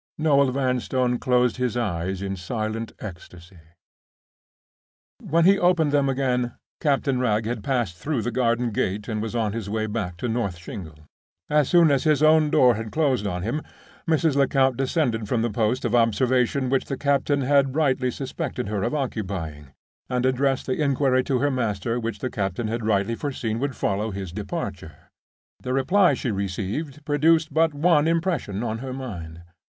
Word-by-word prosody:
Noel 140 -3 +3
Vanstone 125 -1 0
closed 125 -1 +2
his 125 -2 -1
eyes 95 -3 -2
in 95 0 -3
silent 110 +4 -4
ecstasy. 90 -2 -10 1.6
When 170 - +1
he 195 +1 +5
opened 175 -4 +3
them 140 -1 +2
again 125 -2 0 0.2
Captain 140 -3 +1
Wragge 110 -3 +1
had 115 -2 -3
passed 120 -9 -1
through 140 - -2
the 120 - -2
garden 120 0 +1
gate 100 0 -2
and 110 -2 -2
was 115 +1 -4
on 110 -3 0
his 110 -3 -4
way 110 +1 -1
back 105 -5 -4
to 120 - -3
North 110 -6 -2
Shingles. 85 -3 -9 0.5
As 150 -2 +3
soon 170 -3 +5
as 135 -2 +2
his 155 -2 +3
own 155 0 +5
door 125 -4 +5
had 110 0 -5
closed 135 -9 +1
on 90 -2 -3
him, 120 +9 -2 0.5
Mrs. 160 -2 +2
Lecount 135 -2 +3
descended 130 -4 0
from 115 +1 0
the 120 - -1
post 110 +3 0
of - - -1
observation 125 +3 +2
which 135 - +1
the 135 - -4
captain 140 0 +1
had 135 0 +2
rightly 130 -5 +2
suspected 125 -3 -4
her 105 -2 -2
of 125 - -1
occupying, 95 - -4 0.4
and 125 -1 0
addressed 130 +1 +1
the 130 +4 -1
inquiry 135 -2 +2
to 135 - +1
her 145 +3 +1
master 115 -2 -1
which 115 -2 -3
the 130 - -4
captain 100 +2 -2
had 115 +1 -3
rightly 100 +1 +1
foreseen 115 -4 -3
would 135 -1 -2
follow 100 +3 -1
his 95 -3 -6
departure. 95 -5 -5 0.7
The 125 - -3
reply 180 +8 +3
she 125 - -2
received 105 - -4
produced 160 +2 +2
but 160 -1 +2
one 155 0 +3
impression 165 - -1
on 115 -1 -3
her 130 +1 -5
mind. 85 -11 -7
125 Hz, 170 wpm, -24 LUFS, 105-140 Hz, 1.6 s, he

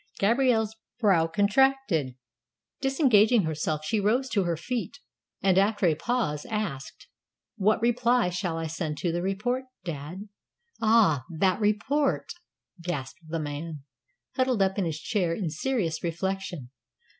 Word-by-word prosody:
Gabrielle's 220 0 +2 0.2
brow 190 -8 +4
contracted. 205 - +2 0.7
Disengaging 245 - +4
herself, 155 -1 -2
she 215 +7 +1
rose 240 +6 +1
to 200 -6 +1
her 170 -2 -1
feet, 245 - -4 0.5
and, 190 -1 +4
after 205 0 +2
a 165 - +4
pause, 160 -4 -1
asked, 205 -12 -4 0.5
"What 215 +1 +3
reply 240 -3 +2
shall 175 -2 -2
I 165 - -3
send 155 -1 -3
to 175 - 0
the 175 +1 -1
report, 245 +8 -1 0.2
dad?" 170 +5 -6 0.5
"Ah, 215 - +4
that 185 +5 +1
report!" 260 +8 0 0.5
gasped 155 -7 -4
the 165 +1 -3
man, 150 0 -5 0.5
huddled 255 -5 +2
up 190 +1 0
in 190 - +1
his 160 -2 -3
chair 175 -4 0
in 175 -5 -3
serious 170 - -1
reflection. 175 -5 -3
195 Hz, 135 wpm, -27 LUFS, 165-230 Hz, 0.7 s, brow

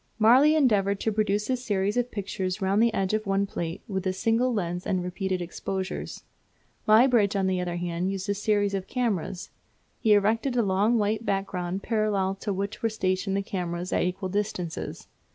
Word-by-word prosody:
Marey 255 +8 +6
endeavoured 200 -9 +2
to 220 - +1
produce 210 0 0
a 260 - +1
series 205 -5 -1
of 245 0 0
pictures 190 -3 -3
round 195 +2 +2
the 235 0 +4
edge 195 -1 -1
of 215 -1 -1
one 195 0 +2
plate 170 -3 -5
with 190 -2 -2
a 185 - +1
single 225 +6 +1
lens 180 -5 -2
and 185 -2 0
repeated 180 0 -2
exposures. 190 +2 -5 0.6
Muybridge, 220 -2 +5
on 195 -1 +1
the 185 -1 0
other 175 -1 -3
hand, 175 +1 -2
used 195 0 -4
a 200 - +1
series 205 0 +1
of 195 -1 -3
cameras. 205 -8 -2 0.5
He 220 -3 +4
erected 225 +5 +2
a 240 - +3
long 205 +4 +2
white 215 +1 0
background 195 -2 -2
parallel 210 -4 0
to 210 - -2
which 200 +2 -3
were 225 - +1
stationed 195 -2 -1
the 200 - -1
cameras 175 -2 -3
at - - +2
equal 185 +1 -2
distances. 190 -4 -3
200 Hz, 185 wpm, -26 LUFS, 185-215 Hz, 0.6 s, Marey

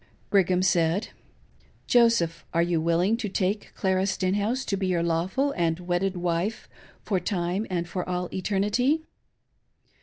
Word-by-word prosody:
Brigham 185 -2 +3
said: 175 +2 +2 0.4
" - - -34
Joseph, 230 -9 +3
are 170 - +4
you 170 -2 0
willing 170 +7 +2
to 225 -4 -3
take 195 +2 -1
Clara 190 0 +1
Stenhouse 205 +7 0
to 200 - -1
be 190 -1 -1
your 175 -2 +1
lawful 180 +12 0
and 165 -6 0
wedded 180 +2 -1
wife 175 +5 -2 0.4
for 195 -3 0
time 180 +2 -2
and 175 -2 -2
for 180 +1 -4
all 180 0 -1
eternity 210 - +1
185 Hz, 145 wpm, -26 LUFS, 175-205 Hz, 0.4 s, are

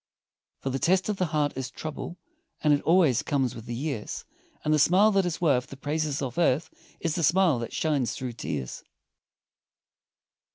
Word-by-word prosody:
For 135 - -2
the 135 - -2
test 185 +6 +2
of 210 - -1
the 185 - +1
heart 150 -2 0
is 130 -1 -4
trouble, 155 +3 -6 0.5
And 150 -1 +5
it 145 - +2
always 165 -8 +4
comes 135 -4 0
with 115 0 -10
the 120 - -3
years, 135 -4 -4 0.4
And 155 - +3
the 155 - +3
smile 185 +8 +5
that 195 -3 +2
is 165 - -3
worth 140 -7 +2
the 135 - -10
praises 150 0 -1
of 130 +3 -3
earth, 160 0 +2 0.3
Is 165 -2 -1
the 170 - -1
smile 170 -4 +4
that 115 - -5
shines 145 -6 0
through 125 -2 -4
tears. 70 - -5
150 Hz, 180 wpm, -27 LUFS, 130-170 Hz, 0.5 s, And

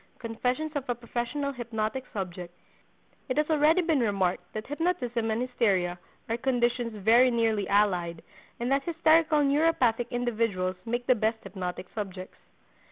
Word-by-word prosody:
—Confessions 250 +6 -2
of 280 -2 -3
a 245 - +1
Professional 240 +4 -3
Hypnotic 240 0 -3
Subject. 180 -3 -5 0.8
It 255 - -1
has 300 0 +2
already 315 +4 +4
been 320 -4 +2
remarked 190 -5 0
that 215 +1 -5
hypnotism 265 -8 -1
and 220 +3 0
hysteria 195 -8 0 0.3
are 230 - -1
conditions 240 -2 0
very 230 +5 +5
nearly 225 -4 +1
allied, 180 -5 +1 0.4
and 240 +2 -1
that 275 +1 +3
hysterical 320 -1 +3
neuropathic 275 -5 +2
individuals 220 -7 -1
make 240 +1 -2
the 255 - +5
best 220 -1 -1
hypnotic 180 -1 -5
subjects. 190 -3 -6
235 Hz, 140 wpm, -28 LUFS, 205-265 Hz, 0.8 s, very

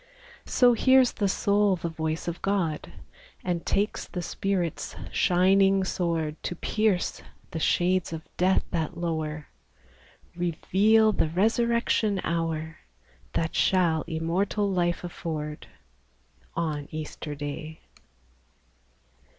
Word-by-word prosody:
So 245 -1 +5
hears 260 +1 +5
the 200 - 0
soul 200 0 +2
the 170 - -4
voice 160 0 -3
of 170 0 -4
God, 185 -6 -1 0.5
And 175 -2 -1
takes 205 +2 0
the 180 - -5
Spirit's 180 -2 -2 0.2
shining 195 +2 +4
sword 165 -4 -2
To 175 - -3
pierce 210 0 0 0.3
the 165 - -3
shades 180 +2 +1
of 160 -1 -5
death 185 +1 +3
that 170 0 -2
lower, 160 -3 -3 0.4
— - - -29
Reveal 200 +6 +3
the 165 - 0
resurrection 225 +2 +2
hour, 165 -1 -2 0.6
That 165 0 -1
shall 170 -4 +3
immortal 175 +6 0
life 175 -2 0
afford, 155 -3 -5 0.9
On 150 -4 -2
Easter 155 -1 -6
Day. 150 +2 -6
175 Hz, 110 wpm, -27 LUFS, 160-195 Hz, 0.9 s, So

